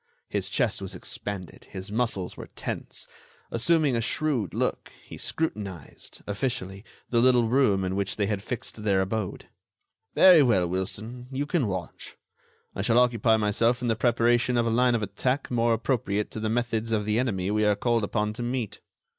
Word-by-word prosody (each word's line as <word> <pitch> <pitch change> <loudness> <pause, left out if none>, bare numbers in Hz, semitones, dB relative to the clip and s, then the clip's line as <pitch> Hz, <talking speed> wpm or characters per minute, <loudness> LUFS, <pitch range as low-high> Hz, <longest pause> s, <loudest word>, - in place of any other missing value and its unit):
His - - -2
chest - - 0
was - - -5
expanded; 100 -4 -6
his 95 +2 -7
muscles 110 -5 -1
were - - -9
tense. - - -4 0.4
Assuming 145 +2 +3
a 115 - +1
shrewd 125 - 0
look, - - -2
he - - -10
scrutinized, 100 - -4
officially, 100 -3 -3 0.3
the 120 -1 +3
little 125 -2 +4
room 110 -6 +3
in 95 0 -2
which 100 -1 -1
they 105 - 0
had 100 -1 -2
fixed 110 0 -6
their 100 -3 +3
abode. 100 0 -3 0.7
"Very 180 -4 +8
well, 95 -10 +3
Wilson, 110 +7 -3
you 135 +2 -2
can 145 -5 0
watch. 95 -4 -6 0.6
I - - -2
shall 115 +3 +2
occupy 115 -2 +4
myself 115 +4 +1
in 120 - 0
the 115 - +2
preparation 120 +1 +2
of 120 - +2
a 115 - +1
line 125 +1 +3
of 110 - -1
attack 125 +8 -2
more 120 -1 +2
appropriate 110 -3 0
to - - -5
the 110 0 -1
methods 115 -1 -1
of 105 -2 +1
the 105 +2 +1
enemy 100 -6 -1
we 105 0 +1
are 105 -1 +3
called 115 0 +1
upon 105 +1 -1
to 115 - -6
meet. 120 -2 -3
115 Hz, 180 wpm, -27 LUFS, 100-125 Hz, 0.7 s, Very